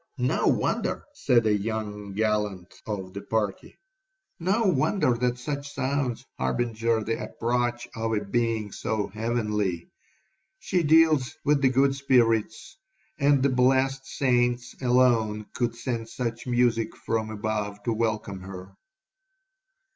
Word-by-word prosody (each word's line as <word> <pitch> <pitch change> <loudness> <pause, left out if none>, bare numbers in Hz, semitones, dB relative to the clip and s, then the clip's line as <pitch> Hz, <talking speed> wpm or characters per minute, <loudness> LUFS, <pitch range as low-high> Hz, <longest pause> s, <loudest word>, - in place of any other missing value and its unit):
'No - - +1
wonder,' - - 0
said 125 - +2
a 105 -1 +3
young 105 -1 -4
gallant 105 -3 -1
of 95 -3 -4
the 100 - -5
party, 100 -1 -3 0.6
'no 195 +7 +1
wonder 180 - +2
that 125 +1 0
such 140 +2 -5
sounds 135 -2 -1
harbinger 115 - 0
the 115 +1 -2
approach 120 0 -1
of 115 0 -2
a 105 -1 -1
being 115 -1 -1
so 110 0 -2
heavenly. 105 -5 -2 0.7
She 185 - 0
deals 155 -4 +4
with 145 -1 +3
the 135 - +5
good 135 +2 +3
spirits; 120 - +1 0.4
and 140 -1 +4
the 140 - +4
blessed 130 +1 +2
saints 125 -2 +1
alone 120 -4 +3
could 120 -1 -1
send 115 -2 -4
such 115 0 -4
music 120 -2 +1
from 110 -1 -2
above 105 -1 -3
to 115 - 0
welcome 110 -3 -2
her.' 95 0 -9
115 Hz, 125 wpm, -26 LUFS, 105-130 Hz, 0.7 s, the